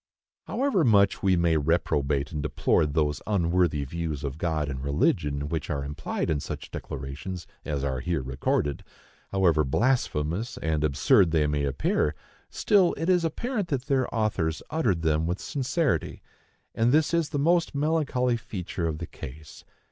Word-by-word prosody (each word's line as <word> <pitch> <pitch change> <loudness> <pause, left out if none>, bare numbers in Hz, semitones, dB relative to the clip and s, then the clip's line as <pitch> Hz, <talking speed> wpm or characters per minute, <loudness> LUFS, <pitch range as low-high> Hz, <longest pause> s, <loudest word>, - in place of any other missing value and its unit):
However 255 - +1
much 100 -6 +4
we 95 -2 +3
may 85 -2 +2
reprobate 75 -2 0
and 75 -2 -3
deplore 75 +1 +1
those 75 0 0
unworthy 85 -6 +1
views 75 0 -4
of 70 +1 -4
God 80 -4 0
and 65 -1 -5
religion 70 0 0
which 80 -1 -3
are 70 -2 -2
implied 75 +3 -3
in 75 - 0
such - - -7
declarations 70 +7 -6 0.2
as 70 -3 -2
are 65 -2 -1
here 80 +1 -2
recorded,—however 75 +5 -1
blasphemous 105 - 0
and 80 -1 -1
absurd 75 +4 +4
they 80 -2 +2
may 75 -1 0
appear,—still, 75 - 0
it 165 +4 -1
is 180 -2 +4
apparent 210 - -2
that 135 -5 -2
their 135 -2 +1
authors 100 -8 -1
uttered 105 - +1
them 80 0 +1
with 90 +2 -2
sincerity: 135 - -1 0.5
and 115 +2 +2
this 155 +3 +3
is 170 -3 +1
the - - -2
most 165 +2 +2
melancholy 140 -5 +1
feature 90 -5 -4
of 80 -2 -2
the 85 - -5
case. 75 +1 -10
85 Hz, 150 wpm, -27 LUFS, -, 0.5 s, much